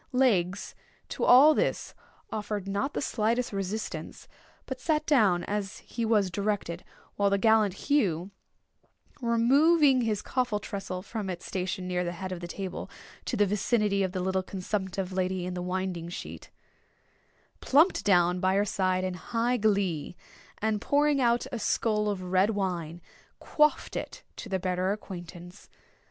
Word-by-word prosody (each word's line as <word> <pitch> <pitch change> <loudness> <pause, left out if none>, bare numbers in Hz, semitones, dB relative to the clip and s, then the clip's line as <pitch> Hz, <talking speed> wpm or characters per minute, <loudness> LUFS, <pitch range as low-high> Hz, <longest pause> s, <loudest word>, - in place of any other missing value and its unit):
Legs 200 -8 +1 0.4
to - - -4
all 280 +5 +8
this - - -1 0.4
offered 210 -2 -4
not 205 +9 -2
the - - -1
slightest 230 0 0
resistance, 195 +2 -5 0.4
but 260 -1 -6
sat 310 -1 0
down 210 - +3
as 205 -1 -3
he 235 - -6
was 210 -4 +2
directed; 200 -4 -2 0.3
while 200 0 +3
the 200 - +2
gallant 215 -2 +3
Hugh, 195 - 0 0.9
removing 265 +4 +4
his 215 -3 -1
coffin 245 -5 -1
tressel 190 -3 -5
from 210 -1 -5
its 175 -2 -6
station 185 0 -3
near 180 0 -1
the 175 0 -3
head 185 +2 -6
of 180 - -4
the 175 - -6
table, 190 +1 -6 0.4
to - - -2
the 205 - +4
vicinity 210 0 +1
of 190 -1 0
the 185 -1 -3
little 190 +1 0
consumptive 190 0 -4
lady 185 -1 -1
in 180 - -4
the 180 - -4
winding 180 -2 -3
sheet, 175 - -8 1.1
plumped 310 +8 +3
down 180 -2 +3
by 185 +1 +2
her 200 +1 +2
side 185 -2 0
in 185 -1 -2
high 230 +7 -1
glee, 195 -8 0 0.5
and 215 -1 0
pouring 290 -1 +2
out 235 -1 +2
a 240 - -3
skull 210 -1 +1
of 195 -3 -3
red 185 +3 +2
wine, 175 -5 -3 0.4
quaffed 300 0 +1
it - - -6
to 225 - -8
their 190 - 0
better 185 0 -1
acquaintance. 175 -2 -10
200 Hz, 155 wpm, -28 LUFS, 185-230 Hz, 1.1 s, all